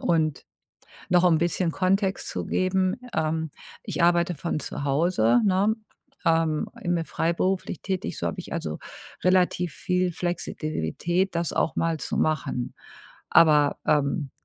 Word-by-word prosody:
Und 155 -4 +1 0.7
noch 180 -1 +5
'n 165 -3 +5
bisschen 170 +1 +1
Kontext 195 +1 0
zu - - -4
geben. 185 0 +1 0.2
Ähm, 160 0 -1 0.3
ich - - -2
arbeite 175 0 +3
von 160 +1 -2
zu - - -5
Hause, 145 - +3
ne, 200 +3 +3 0.5
ähm, 165 -2 +2
immer 175 -2 0
freiberuflich 170 +2 -1
tätig, 190 -1 -3
so - - -2
habe 190 - -5
ich - - -10
also 160 - -3 0.5
relativ 180 -2 +2
viel 180 0 0
Flexibilität, 175 - -2
das 170 -1 -1
auch - - 0
mal 165 -1 0
zu - - -4
machen. 145 -5 -1 0.6
Aber, 150 -3 +5
ähm, 140 -1 +1
170 Hz, 135 wpm, -25 LUFS, 155-185 Hz, 0.7 s, noch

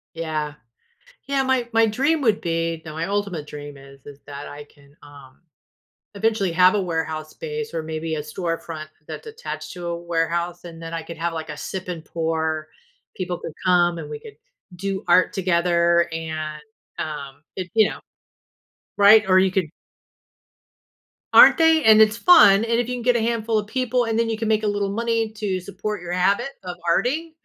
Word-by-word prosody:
Yeah. 155 -2 -3 0.7
Yeah, 275 -1 +1
my 260 -2 0
my 225 0 +4
dream 275 +9 +1
would 220 -5 +2
be 165 -1 -2
no, 155 - -8
my 165 +1 -3
ultimate 200 -6 -2
dream 145 -1 -9
is 135 0 -15
is 145 -1 -12
that 140 0 -8
I 145 0 -9
can, 140 -1 -23
um, 140 -2 -15 0.7
eventually 205 -2 0
have 180 +2 +5
a 205 - +1
warehouse 160 -3 -3
space 455 - -6
or - - -2
maybe 160 0 -4
a 150 - -3
storefront 165 -1 -5 0.2
that's - - -8
attached 450 +2 -7
to 175 -1 -7
a 170 - -2
warehouse, 170 +1 -2
and 165 -1 -10
then 165 0 -7
I 165 -1 -4
could 170 0 -9
have, 170 +1 -1
like, 160 -1 -6
a 150 - -5
sip 185 +5 -6
and 170 -3 -5
pour; 160 -1 -2 0.5
people 180 -2 -4
could 160 - -7
come, 175 -1 +3
and - - -7
we 445 - -6
could 445 -1 -13 0.4
do 195 +1 -4
art 185 -1 +4
together, 170 -2 +2
and, 155 -2 -5 0.4
um 145 -2 -6
it 185 -2 -5
you 220 -1 +4
know? - - -8 1.0
Right, 210 +1 +7
or 185 0 +6
you 190 0 +3
could 190 -3 +1 1.7
Aren't - - +9
they? 320 -1 +5
And 220 -3 +7
it's 215 0 +5
fun, 225 - +7
and 230 0 0
if 240 -1 -1
you 250 - -2
can 245 - -5
get 245 0 +3
a - - +1
handful 225 -1 0
of 210 - -3
people, 250 +1 0
and 225 -1 -1
then 230 0 +1
you 220 - -2
can 225 - -2
make 215 0 +2
a 215 - 0
little 205 -1 -1
money 230 0 -1
to 210 -4 -2
support 200 +3 -5
your 175 0 -6
habit 200 +8 +1
of 180 -1 -6
arting, 310 - 0
180 Hz, 190 wpm, -22 LUFS, 160-220 Hz, 1.7 s, Aren't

